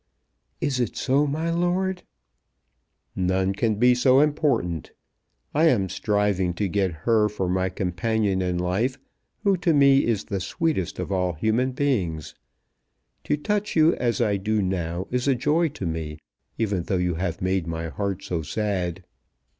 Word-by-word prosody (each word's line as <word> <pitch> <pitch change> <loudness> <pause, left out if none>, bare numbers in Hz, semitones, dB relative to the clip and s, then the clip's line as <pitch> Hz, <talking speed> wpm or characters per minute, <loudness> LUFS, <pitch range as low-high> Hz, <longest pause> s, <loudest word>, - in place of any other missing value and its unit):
"Is 140 -4 -1
it 120 -4 -1
so, 140 +3 +2
my 160 +4 -1
lord?" 180 +2 0 1.1
"None 95 +1 +1
can 110 +2 0
be 125 +4 +5
so 130 +2 +4
important. 145 - 0 0.6
I 155 +3 +3
am 100 -11 +2
striving 100 -4 0
to 100 +2 -1
get 95 -1 0
her 110 -2 +3
for 95 -3 -3
my 95 +1 0
companion 95 +2 -1
in 90 -1 -1
life, 95 +9 0 0.5
who 200 -2 +4
to 170 -2 +2
me 140 -1 +5
is 110 -4 0
the 100 -3 -3
sweetest 95 - -2
of - - -4
all 90 -2 0
human 110 +10 0
beings. 95 - -1 0.9
To 150 - +1
touch 210 +6 -2
you 160 +1 +5
as 120 -2 0
I 105 -4 +2
do 110 +2 0
now 90 -2 -2
is 125 +1 -1
a 135 - +4
joy 150 +7 +2
to 135 -10 -6
me, 80 -2 -4 0.4
even 105 -5 0
though 95 +3 -1
you 90 0 0
have 85 -3 -2
made 95 -2 0
my 80 0 -3
heart 100 +1 -3
so 90 -4 -2
sad." 95 0 -2
105 Hz, 160 wpm, -24 LUFS, 90-135 Hz, 1.1 s, be